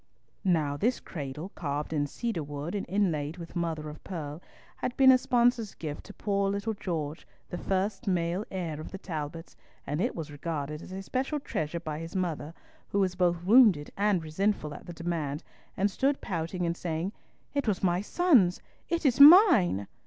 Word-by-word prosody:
Now 155 -7 +1
this 240 - +1
cradle, 150 +2 -6
carved 150 -3 -4
in 145 -2 0
cedar 225 - -3
wood 145 +3 -5
and 205 - -3
inlaid 165 -5 0
with 170 0 -9
mother 165 -3 -2
of 150 0 -9
pearl, 155 -4 -6 0.4
had 245 - -3
been 265 -1 +8
a 255 - +7
sponsor's 245 -4 +2
gift 150 -2 -6
to 205 - -11
poor 200 -1 0
little 200 +3 -2
George, 165 -6 -4 0.2
the 175 - -4
first 195 +5 -1
male 175 +1 0
heir 165 -5 -4
of - - -8
the 190 - -7
Talbots, 165 -3 -6 0.3
and 150 +4 -2
it - - 0
was 160 -3 -6
regarded 150 0 -4
as - - -11
a 190 +1 -5
special 265 +8 -2
treasure 170 - -3
by 155 -2 -5
his 165 +3 -8
mother, 165 -3 -2 0.3
who 200 - 0
was 190 -2 +2
both 175 -2 +1
wounded 205 - +6
and 200 -4 +1
resentful 155 -1 -1
at - - -11
the 175 - -6
demand, 160 -4 -3 0.3
and 200 +2 +2
stood 275 +6 +1
pouting 175 0 -3
and 170 0 0
saying, 170 +2 -3 0.4
"It 280 -3 -1
was 200 -3 0
my 180 0 +2
son's. 230 - +3 0.3
It 335 -1 -1
is 255 -2 +3
mine." 280 - +8
175 Hz, 180 wpm, -29 LUFS, 155-205 Hz, 0.4 s, been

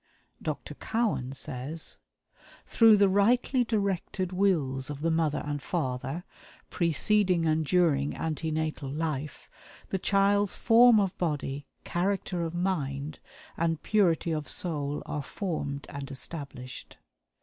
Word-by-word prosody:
Dr. - - -4
Cowan 220 - -1
says: 135 +4 -4 0.7
"Through 225 -2 +6
the 200 0 +5
rightly 240 +6 +3
directed 200 -4 -1
wills 150 -9 +1
of 145 -1 -6
the 165 +1 +1
mother 160 -2 +1
and 145 -1 -3
father, 130 +6 -3 0.5
preceding 180 +2 +2
and 160 0 +2
during 155 -4 +2
ante 160 0 -2
natal 155 -3 -2
life, 150 -1 -3 0.4
the 190 - -1
child's 200 +1 +2
form 235 -1 +6
of 195 -3 0
body, 145 -4 -2 0.2
character 180 0 -1
of 165 0 -3
mind, 150 -5 -2 0.4
and 165 -2 -1
purity 175 -6 +2
of 155 -2 -3
soul 150 -4 -1
are 150 - -3
formed 140 -3 -4
and 140 0 -6
established. 135 -2 -8
165 Hz, 120 wpm, -28 LUFS, 145-195 Hz, 0.7 s, Through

